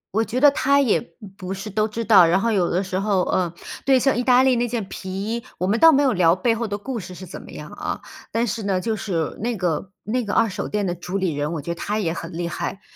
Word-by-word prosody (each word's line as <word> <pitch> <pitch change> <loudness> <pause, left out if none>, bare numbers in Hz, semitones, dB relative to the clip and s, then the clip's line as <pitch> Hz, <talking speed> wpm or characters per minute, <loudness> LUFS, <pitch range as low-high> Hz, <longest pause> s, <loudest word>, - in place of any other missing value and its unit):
我 225 +2 +2
觉 245 +4 -2
得 290 -1 +8
他 280 0 +3
也 250 -7 +3
不 - - -13 0.3
不 185 -1 -5
是 195 +2 -6
都 215 +1 0
知 230 +2 -4
道， 210 -6 +7
然 180 +4 +2
后 230 - +1
有 190 -5 +2
的 185 +3 0
时 185 0 -2
候， 195 -2 +1
呃 180 -2 0 0.3
对， 270 -1 +5
像 270 +1 +2
意 245 - 0
大 255 0 +5
利 260 -2 +3
那 240 +1 +1
件 235 -2 -2
皮 190 - -7
衣， 210 +5 -3
我 185 - -1
们 215 +4 +1
倒 325 0 +8
没 285 +1 +4
有 270 - +3
聊 175 -5 +4
背 230 +5 +1
后 230 0 -2
的 205 -1 -3
故 235 +3 -5
事 185 -2 -9
是 185 - -9
怎 170 - -9
么 - - -13
样 - - -9
啊， - - -4 0.3
但 230 +1 +1
是 225 0 -3
呢， 195 -2 0
就 220 +2 -1
是 170 -7 -2
那 235 +2 -1
个 180 -1 -2
那 240 +3 -1
个 205 - -3
二 225 - +3
手 185 - -4
店 210 -1 -1
的 175 -2 -1
主 180 +2 -4
理 185 -4 0
人， 145 +2 -2
我 160 - -3
觉 170 +4 -3
得 - - -10
他 210 +1 -2
也 185 -7 0
很 165 +1 -6
厉 170 +1 -3
害。 195 - -4
205 Hz, 310 characters per minute, -22 LUFS, 185-235 Hz, 0.3 s, 得